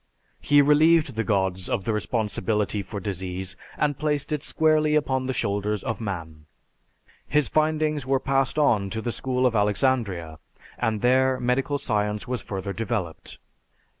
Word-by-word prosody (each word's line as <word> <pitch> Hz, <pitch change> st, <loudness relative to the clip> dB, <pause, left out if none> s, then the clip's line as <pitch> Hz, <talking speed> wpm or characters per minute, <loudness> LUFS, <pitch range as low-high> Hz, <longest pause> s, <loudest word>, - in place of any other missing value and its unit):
He 145 Hz, 0 st, +5 dB
relieved 150 Hz, 0 st, +4 dB
the 110 Hz, 0 st, -1 dB
gods 95 Hz, -4 st, 0 dB
of 95 Hz, -, -1 dB
the 115 Hz, -, -1 dB
responsibility 105 Hz, -1 st, -1 dB
for 100 Hz, +1 st, -6 dB
disease 95 Hz, -1 st, -4 dB, 0.2 s
and 145 Hz, -2 st, 0 dB
placed 150 Hz, -1 st, -1 dB
it 150 Hz, -2 st, -1 dB
squarely 155 Hz, -1 st, +2 dB
upon 130 Hz, -3 st, 0 dB
the -, -, 0 dB
shoulders 105 Hz, -2 st, -1 dB
of 115 Hz, -2 st, -3 dB
man. 80 Hz, -7 st, -6 dB, 0.8 s
His 150 Hz, -1 st, +2 dB
findings 155 Hz, -1 st, +1 dB
were 135 Hz, +1 st, +1 dB
passed 135 Hz, 0 st, 0 dB
on 110 Hz, -10 st, +3 dB
to 110 Hz, +2 st, -4 dB
the 120 Hz, -, -1 dB
School 130 Hz, +1 st, -1 dB
of 120 Hz, -2 st, +2 dB
Alexandria, 100 Hz, -, 0 dB, 0.4 s
and 110 Hz, -3 st, 0 dB
there 130 Hz, +1 st, +3 dB
medical 130 Hz, +3 st, 0 dB
science 105 Hz, -4 st, -2 dB
was 125 Hz, -1 st, -2 dB
further 100 Hz, 0 st, -5 dB
developed. 110 Hz, -7 st, -4 dB
120 Hz, 150 wpm, -25 LUFS, 100-140 Hz, 0.8 s, He